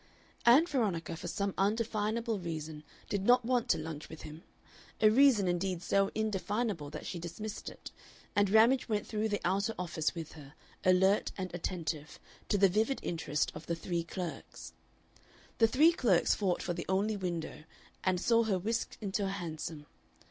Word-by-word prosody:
Ann 265 Hz, +8 st, +8 dB
Veronica 205 Hz, -, -1 dB
for -, -, -7 dB
some 200 Hz, -1 st, -2 dB
indefinable 220 Hz, +1 st, 0 dB
reason 155 Hz, -3 st, -5 dB, 0.2 s
did 200 Hz, -2 st, -2 dB
not 245 Hz, +2 st, +5 dB
want 245 Hz, 0 st, +1 dB
to -, -, +4 dB
lunch 155 Hz, -1 st, -6 dB
with 160 Hz, -, -10 dB
him, 155 Hz, +1 st, -9 dB, 0.6 s
a 215 Hz, -, +6 dB
reason 245 Hz, -5 st, +5 dB
indeed 175 Hz, 0 st, -1 dB
so 195 Hz, 0 st, +2 dB
indefinable 210 Hz, -5 st, -1 dB
that -, -, -8 dB
she 175 Hz, -, -4 dB
dismissed 185 Hz, +6 st, -6 dB
it, -, -, -11 dB, 0.4 s
and 205 Hz, -1 st, +3 dB
Ramage 230 Hz, +5 st, +4 dB
went 210 Hz, -2 st, 0 dB
through 215 Hz, 0 st, -1 dB
the 205 Hz, -, -1 dB
outer 200 Hz, +5 st, 0 dB
office 170 Hz, -2 st, -2 dB
with 165 Hz, -2 st, -6 dB
her, 150 Hz, -1 st, -13 dB, 0.3 s
alert 190 Hz, +2 st, +4 dB
and 185 Hz, -2 st, -4 dB
attentive, 165 Hz, -3 st, -4 dB, 0.3 s
to 205 Hz, -, +3 dB
the 195 Hz, 0 st, +6 dB
vivid 220 Hz, +8 st, +1 dB
interest 160 Hz, -3 st, -1 dB
of 155 Hz, -, -10 dB
the 170 Hz, -, 0 dB
three 170 Hz, 0 st, -2 dB
clerks. 175 Hz, 0 st, -7 dB, 0.9 s
The 225 Hz, -, +6 dB
three 295 Hz, +8 st, +5 dB
clerks 220 Hz, -, +3 dB
fought 190 Hz, -4 st, 0 dB
for 175 Hz, -, -2 dB
the 170 Hz, 0 st, -6 dB
only 200 Hz, +3 st, +1 dB
window, 170 Hz, -5 st, -4 dB, 0.4 s
and 185 Hz, -1 st, +1 dB
saw 230 Hz, +4 st, +3 dB
her 200 Hz, -4 st, +1 dB
whisked 220 Hz, +6 st, -2 dB
into 200 Hz, 0 st, -1 dB
a -, -, -1 dB
hansom. 160 Hz, -5 st, -5 dB
195 Hz, 170 wpm, -32 LUFS, 170-220 Hz, 0.9 s, Ann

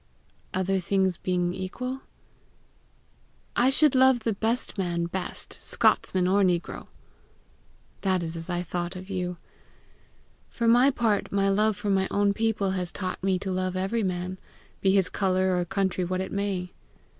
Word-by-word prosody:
"Other 190 Hz, +1 st, 0 dB
things 190 Hz, 0 st, +1 dB
not -, -, -37 dB
being 180 Hz, -1 st, 0 dB
equal, 250 Hz, +8 st, -5 dB, 0.7 s
?" -, -, -37 dB
"I 250 Hz, +2 st, +4 dB
should 295 Hz, +1 st, +4 dB
love 260 Hz, -2 st, +5 dB
the 225 Hz, 0 st, 0 dB
best 225 Hz, +5 st, -1 dB
man 170 Hz, -2 st, 0 dB
best 180 Hz, +1 st, -5 dB
Scotsman 185 Hz, -1 st, +2 dB
or 200 Hz, +2 st, +3 dB
negro." 175 Hz, -3 st, 0 dB, 1.1 s
"That 185 Hz, -3 st, +1 dB
is 165 Hz, 0 st, -4 dB
as 165 Hz, +1 st, -7 dB
I 175 Hz, 0 st, -1 dB
thought 175 Hz, +1 st, -4 dB
of 185 Hz, +2 st, -8 dB
you. 180 Hz, -2 st, -3 dB, 1.1 s
For 235 Hz, -, -1 dB
my 245 Hz, +4 st, +6 dB
part, 230 Hz, -6 st, 0 dB
my 195 Hz, 0 st, +2 dB
love 210 Hz, +1 st, +2 dB
for 205 Hz, -1 st, -1 dB
my 190 Hz, -1 st, +2 dB
own 200 Hz, 0 st, +2 dB
people 210 Hz, -2 st, 0 dB
has 180 Hz, -2 st, -2 dB
taught 185 Hz, -2 st, -4 dB
me 190 Hz, -1 st, +2 dB
to 190 Hz, +1 st, -4 dB
love 185 Hz, 0 st, -1 dB
every 195 Hz, +5 st, 0 dB
man, 185 Hz, -1 st, -3 dB, 0.4 s
be 195 Hz, -, +3 dB
his 195 Hz, -2 st, +4 dB
colour 185 Hz, -1 st, +1 dB
or 175 Hz, -1 st, 0 dB
country 190 Hz, 0 st, -1 dB
what 185 Hz, +1 st, -2 dB
it 190 Hz, -, -5 dB
may. 195 Hz, -3 st, -2 dB
190 Hz, 165 wpm, -27 LUFS, 180-205 Hz, 1.1 s, my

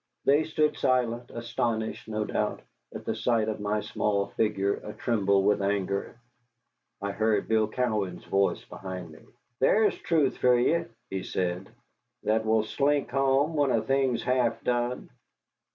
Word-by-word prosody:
They 145 Hz, +3 st, +4 dB
stood 155 Hz, -1 st, +1 dB
silent, 125 Hz, -2 st, +1 dB
astonished, 115 Hz, -1 st, -3 dB
no 110 Hz, -1 st, -2 dB
doubt, -, -, -2 dB, 0.3 s
at -, -, -8 dB
the -, -, -1 dB
sight 115 Hz, -3 st, +1 dB
of 110 Hz, -1 st, -2 dB
my 105 Hz, +1 st, -1 dB
small 100 Hz, -2 st, 0 dB
figure 100 Hz, -2 st, 0 dB
a 105 Hz, -, -7 dB
tremble 100 Hz, -4 st, +1 dB
with 105 Hz, 0 st, +2 dB
anger. 100 Hz, +2 st, -1 dB, 0.9 s
I 100 Hz, -, -1 dB
heard 110 Hz, 0 st, +1 dB
Bill 110 Hz, -1 st, +2 dB
Cowan's 110 Hz, -6 st, -2 dB
voice 100 Hz, 0 st, +1 dB
behind 90 Hz, -3 st, -7 dB
me. 80 Hz, -, -14 dB, 0.4 s
"There's 210 Hz, +10 st, +4 dB
truth 155 Hz, -6 st, +1 dB
for 125 Hz, -1 st, +4 dB
ye," 160 Hz, +7 st, +2 dB, 0.3 s
he 95 Hz, -1 st, -2 dB
said, 90 Hz, 0 st, -3 dB, 0.5 s
"that 110 Hz, +1 st, +1 dB
will 110 Hz, 0 st, +3 dB
slink 140 Hz, +4 st, 0 dB
home 135 Hz, +3 st, +2 dB
when 145 Hz, -3 st, +2 dB
a 115 Hz, -, +3 dB
thing's 130 Hz, -1 st, +1 dB
half 120 Hz, -3 st, +1 dB
done." 120 Hz, 0 st, -1 dB
110 Hz, 150 wpm, -28 LUFS, 100-130 Hz, 0.9 s, They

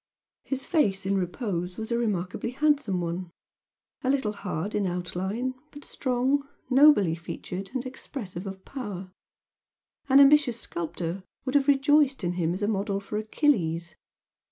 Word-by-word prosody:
His 270 Hz, -1 st, -2 dB
face 205 Hz, -, +1 dB
in 195 Hz, +1 st, +1 dB
repose 180 Hz, -1 st, -2 dB
was 220 Hz, +1 st, -5 dB
a 235 Hz, -, +2 dB
remarkably 200 Hz, -2 st, -1 dB
handsome 285 Hz, -10 st, +2 dB
one, 170 Hz, +1 st, -3 dB, 0.7 s
a 255 Hz, -, +1 dB
little 265 Hz, -6 st, +1 dB
hard 200 Hz, -1 st, -4 dB
in 205 Hz, -2 st, +1 dB
outline, 190 Hz, +8 st, -2 dB, 0.2 s
but 290 Hz, 0 st, -12 dB
strong, 265 Hz, +2 st, 0 dB, 0.2 s
nobly 260 Hz, -, +6 dB
featured 180 Hz, +3 st, -6 dB
and 255 Hz, 0 st, -2 dB
expressive 210 Hz, -8 st, -6 dB
of 190 Hz, 0 st, -8 dB
power, 200 Hz, -9 st, -6 dB, 1.0 s
an 270 Hz, +1 st, +7 dB
ambitious 280 Hz, -4 st, +6 dB
sculptor 170 Hz, +2 st, -4 dB, 0.2 s
would 260 Hz, -, -2 dB
have 285 Hz, -1 st, +3 dB
rejoiced 285 Hz, -2 st, +4 dB
in 175 Hz, 0 st, 0 dB
him 170 Hz, -2 st, 0 dB
as 200 Hz, -, -4 dB
a -, -, +2 dB
model 200 Hz, -1 st, 0 dB
for 210 Hz, +1 st, -4 dB
Achilles. 175 Hz, -, +1 dB
210 Hz, 145 wpm, -27 LUFS, 180-270 Hz, 1.0 s, an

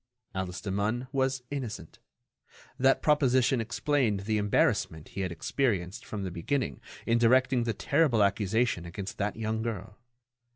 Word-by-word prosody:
Alice 95 Hz, -1 st, -4 dB
Demun 105 Hz, +5 st, -1 dB
was 130 Hz, -2 st, 0 dB
innocent. 120 Hz, -, -5 dB, 0.8 s
That 135 Hz, +1 st, +3 dB
proposition 130 Hz, -4 st, +3 dB
explained 120 Hz, -2 st, 0 dB
the 110 Hz, +1 st, 0 dB
embarrassment 90 Hz, -6 st, +1 dB
he 95 Hz, -, -5 dB
had 95 Hz, -2 st, -2 dB
experienced 95 Hz, -, -1 dB
from 105 Hz, -2 st, -4 dB
the 95 Hz, -, -3 dB
beginning 85 Hz, -, -2 dB, 0.2 s
in 115 Hz, 0 st, +2 dB
directing 125 Hz, +1 st, +4 dB
the 115 Hz, -, 0 dB
terrible 125 Hz, -7 st, +3 dB
accusation 100 Hz, 0 st, +1 dB
against 100 Hz, +3 st, -6 dB
that 105 Hz, 0 st, -1 dB
young 110 Hz, 0 st, -2 dB
girl. 105 Hz, -2 st, -5 dB
110 Hz, 135 wpm, -29 LUFS, 100-130 Hz, 0.8 s, directing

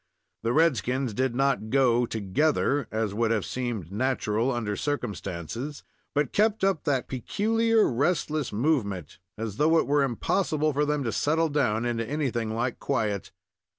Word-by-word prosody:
The 115 Hz, -, 0 dB
red 155 Hz, 0 st, +4 dB
skins 125 Hz, -1 st, -1 dB
did 130 Hz, +2 st, 0 dB
not 135 Hz, -4 st, +1 dB
go 125 Hz, -2 st, +3 dB
together, 135 Hz, +6 st, +1 dB
as 110 Hz, -2 st, -1 dB
would 115 Hz, +2 st, +1 dB
have 110 Hz, -3 st, 0 dB
seemed 120 Hz, -9 st, -4 dB
natural 120 Hz, +1 st, 0 dB
under 110 Hz, -4 st, -2 dB
circumstances, 115 Hz, -, -4 dB, 0.3 s
but 145 Hz, 0 st, +1 dB
kept 215 Hz, 0 st, +2 dB
up 190 Hz, -6 st, +1 dB
that 135 Hz, -4 st, 0 dB
peculiar 220 Hz, -, +1 dB
restless 150 Hz, +2 st, 0 dB
movement, 105 Hz, -, -1 dB, 0.2 s
as 110 Hz, -2 st, -4 dB
though 160 Hz, +2 st, +4 dB
it -, -, +3 dB
were 145 Hz, +1 st, +2 dB
impossible 155 Hz, -, 0 dB
for 145 Hz, +1 st, +1 dB
them 150 Hz, -1 st, 0 dB
to 115 Hz, -, -1 dB
settle 160 Hz, +6 st, +1 dB
down 120 Hz, -6 st, +1 dB
into 120 Hz, -1 st, -1 dB
anything 120 Hz, -4 st, -2 dB
like 120 Hz, +1 st, -2 dB
quiet. 105 Hz, -7 st, -1 dB
130 Hz, 150 wpm, -27 LUFS, 110-150 Hz, 0.3 s, red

